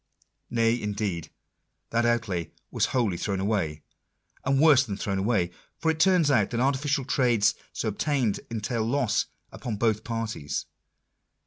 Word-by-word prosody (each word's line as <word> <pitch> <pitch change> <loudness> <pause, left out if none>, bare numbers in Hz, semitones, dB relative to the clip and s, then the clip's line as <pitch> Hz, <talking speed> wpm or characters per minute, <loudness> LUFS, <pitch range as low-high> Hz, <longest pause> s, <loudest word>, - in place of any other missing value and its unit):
Nay, 115 0 +2
indeed, 100 -6 -2 0.6
that 115 +1 +2
outlay 105 -8 0 0.2
was - - +1
wholly 115 -9 0
thrown 100 +2 -2
away, 95 -7 -1 0.6
and 135 0 +2
worse 145 -3 +7
than 100 -7 -5
thrown 100 -1 -2
away; 95 -4 +1 0.3
for 160 - +2
it 160 - -5
turns 175 -4 +4
out 110 -7 +3
that 120 - -2
artificial 140 +2 +1
trades 120 -5 +3 0.2
so 110 - -2
obtained 125 -1 0
entail 115 0 -2
loss 120 -1 +1 0.2
upon 115 -3 -4
both 110 0 +1
parties. 115 -10 -3
115 Hz, 140 wpm, -27 LUFS, 100-130 Hz, 0.6 s, worse